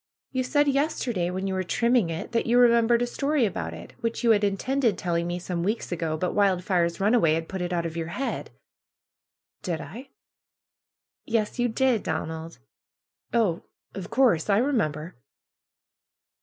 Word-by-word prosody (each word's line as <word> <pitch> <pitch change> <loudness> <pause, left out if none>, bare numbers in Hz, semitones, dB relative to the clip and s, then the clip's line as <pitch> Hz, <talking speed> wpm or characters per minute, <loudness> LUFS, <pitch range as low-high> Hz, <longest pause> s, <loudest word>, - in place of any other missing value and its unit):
You 260 -1 0
said 290 +3 +2
yesterday, 265 - 0
when 185 +2 -3
you 190 - -1
were 185 - 0
trimming 235 +1 +2
it, 165 0 -5
that 235 0 0
you 240 +1 +3
remembered 235 -1 +5
a - - +2
story 275 +2 0
about 85 - -3
it, 85 +1 -10
which 230 +1 -3
you 235 - +5
had 210 -1 +3
in 200 -1 +1
tended 255 -4 0
telling 170 -1 -1
me 175 0 -2
some 175 -1 -4
weeks 210 +4 -2
ago; 165 -2 -2
but 180 +3 -1
Wildfire's 180 -3 +1
run 205 +4 +2
away 165 -10 +4
had 165 0 -3
put 190 -2 -5
it 175 0 -2
out 170 -1 -1
of 165 -1 -4
your 165 -1 -3
head." 265 +11 -4 1.1
^^Did 170 -3 -3
I?" 230 - -9 1.2
^^Yes, 225 +1 0
you 245 - +3
did, 245 -1 +1
Donald!" 160 +1 -4 0.7
^^Oh, 210 -8 +1 0.3
of 190 -1 -7
course! 230 -9 +2
I 200 - +4
remember." 180 - -1
200 Hz, 170 wpm, -26 LUFS, 170-240 Hz, 1.2 s, remembered